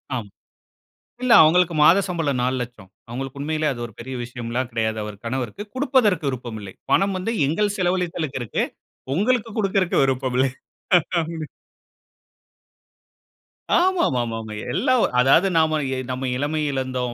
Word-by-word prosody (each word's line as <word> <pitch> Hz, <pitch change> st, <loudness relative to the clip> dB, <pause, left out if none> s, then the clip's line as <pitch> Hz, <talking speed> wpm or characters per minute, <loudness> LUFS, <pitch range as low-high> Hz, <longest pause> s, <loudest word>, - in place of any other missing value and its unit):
ஆமா. 110 Hz, -5 st, -5 dB, 0.9 s
இல்ல. 255 Hz, -2 st, +3 dB
அவுங்களுக்கு 170 Hz, +2 st, +4 dB
மாத 170 Hz, +5 st, +7 dB
சம்பளம் 160 Hz, -7 st, -1 dB
4,00,000 125 Hz, -6 st, -3 dB, 0.2 s
அவுங்களுக்கு 135 Hz, +3 st, -6 dB
உண்மையிலேயே, 155 Hz, 0 st, 0 dB
அது 120 Hz, -, -8 dB
ஒரு 115 Hz, -, -15 dB
பெரிய 130 Hz, +3 st, -6 dB
விஷயம்லாம் 120 Hz, +1 st, -4 dB
கெடையாது, 110 Hz, -1 st, -1 dB
அவர் 105 Hz, -1 st, -7 dB
கணவருக்கு. 130 Hz, -, -3 dB
குடுப்பதற்கு 240 Hz, -, +2 dB
விருப்பம் 120 Hz, -4 st, -5 dB
இல்லை. 95 Hz, -2 st, -9 dB, 0.2 s
பணம் 195 Hz, 0 st, +3 dB
வந்து, 210 Hz, +5 st, -2 dB
எங்கள் 205 Hz, +7 st, 0 dB
செலவழித்தலுக்கு 175 Hz, -6 st, -1 dB
இருக்கு. 110 Hz, -, -1 dB, 0.5 s
உங்களுக்கு 230 Hz, +4 st, +1 dB
குடுக்கறதுக்கு 195 Hz, -6 st, +2 dB
விருப்பம் 130 Hz, -1 st, -1 dB
இல்லை. 130 Hz, 0 st, +3 dB, 0.7 s
அப்டி 160 Hz, -1 st, -4 dB, 2.3 s
ஆமாமாமா. 130 Hz, -, +1 dB, 0.4 s
எல்லா 255 Hz, -, +2 dB, 0.3 s
அதாவது 135 Hz, +9 st, +5 dB
நாம, 155 Hz, -1 st, +3 dB, 0.3 s
நம்ம 130 Hz, +1 st, -3 dB
இளமய 150 Hz, +1 st, -1 dB
இழந்தோம், 130 Hz, -2 st, -2 dB
140 Hz, 125 wpm, -22 LUFS, 125-180 Hz, 2.3 s, மாத